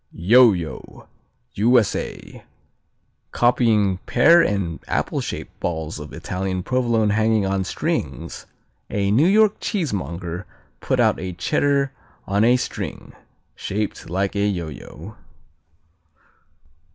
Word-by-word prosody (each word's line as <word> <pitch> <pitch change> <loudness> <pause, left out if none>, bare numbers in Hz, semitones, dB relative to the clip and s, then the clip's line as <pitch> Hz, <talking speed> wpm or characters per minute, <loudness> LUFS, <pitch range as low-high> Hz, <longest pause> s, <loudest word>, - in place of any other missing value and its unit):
Yo 115 +7 +6
yo 85 -5 -7 0.5
U.S.A. 115 0 0 0.9
Copying 110 -6 +2
pear 165 +8 +6
and 100 - -1
apple - - -1
shaped - - -7
balls 80 -2 -3
of 75 0 -9
Italian 95 0 -4
Provolone 115 -4 +1
hanging 110 -1 +2
on 95 0 0
strings, 90 - -4 0.4
a 100 -1 0
New 135 +11 +4
York 215 +1 +4
cheesemonger 90 - -3 0.3
put - - -1
out - - +3
a 95 -1 -5
Cheddar 140 +9 +1 0.3
on 100 +2 +1
a 120 +2 +5
string, 125 - -6 0.4
shaped 105 -3 -4
like 95 +3 -1
a 100 0 +1
yo 85 -6 -2
yo. 75 - -11
100 Hz, 110 wpm, -22 LUFS, 90-120 Hz, 0.9 s, Yo